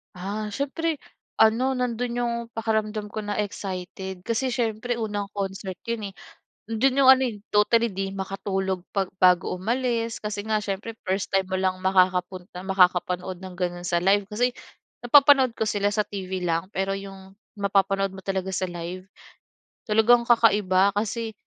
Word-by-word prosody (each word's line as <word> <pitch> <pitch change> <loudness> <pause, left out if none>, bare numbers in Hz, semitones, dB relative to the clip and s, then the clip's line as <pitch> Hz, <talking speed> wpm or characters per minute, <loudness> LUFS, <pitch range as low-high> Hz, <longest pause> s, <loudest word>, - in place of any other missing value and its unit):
Ah, 205 +3 -4
siyempre 290 +5 -2 0.4
ano 230 +4 +4
nando'n 245 -1 -2
yung 240 -1 0 0.2
pakiramdam 220 -1 -1
ko 215 +1 -5
na 205 0 -3
excited 190 -2 -5
kasi 245 +3 0
siyempre 235 0 -1
unang 205 -2 -3
concert 195 -2 -5
yun, 220 -4 -3
eh, - - -28 0.5
nando'n 240 +5 +1
yung 270 -1 +6
ano, 265 - -1
eh, 210 - -8 0.2
totally 225 +1 +3
di 195 0 -2
makatulog 190 -1 -3
pag 195 -1 0 0.2
bago 180 -1 +4
umalis 230 +3 -1
kasi 210 -1 -4
nga 215 0 0
siyempre 210 +2 -4
1st 190 +2 -1
time 195 -1 +1
mo 190 - -7
lang 185 -1 +1
makakapunta 185 0 0
makakapanood 180 -1 +2
ng 185 0 -9
gano'n 175 0 -3
sa 175 -1 +1
live. 195 +2 +3
Kasi 230 +5 0 0.6
napapanood 275 -1 +6
ko 220 -1 -1
sila 205 0 0
sa 210 - +2
TV 190 -2 -5
lang 175 +3 -2
pero 195 +1 -1
yung 195 0 -11 0.2
mapapanood 195 -1 +1
mo 190 - -9
talaga 190 -1 -2
sa 190 0 -1
live 175 +1 -6 0.8
talagang 230 +3 +5
kakaiba 200 -4 +4
kasi 220 +2 -2
200 Hz, 155 wpm, -25 LUFS, 190-225 Hz, 0.8 s, yung